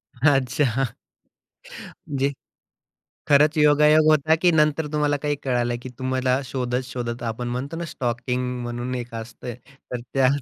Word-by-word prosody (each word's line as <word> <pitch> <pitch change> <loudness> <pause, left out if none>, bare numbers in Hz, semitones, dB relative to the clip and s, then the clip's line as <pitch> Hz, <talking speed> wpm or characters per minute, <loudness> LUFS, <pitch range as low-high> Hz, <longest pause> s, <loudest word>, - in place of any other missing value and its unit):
अच्छा. 135 -1 +2 1.3
जे 140 +1 +2 1.0
खरंच 150 +2 +5
योगायोग 150 +1 +5
होता, 155 +1 +4
की 175 +2 +3
नंतर 150 -1 +2
तुम्हाला 150 -1 +1
काही 145 -1 0
कळालं 120 -2 0
की - - -6
तुम्हाला 130 0 0
शोधत-शोधत, 125 -1 -3
आपण 120 +1 -3
म्हणतो 130 +6 -4
ना, 170 - -4
स्टॉकींग 125 -1 -2 0.2
म्हणून 120 +1 -4
एक 120 -1 -5
असतं. 115 +1 -7 0.4
तर 125 - -2
त्या 135 -2 +4
130 Hz, 125 wpm, -23 LUFS, 120-150 Hz, 1.3 s, खरंच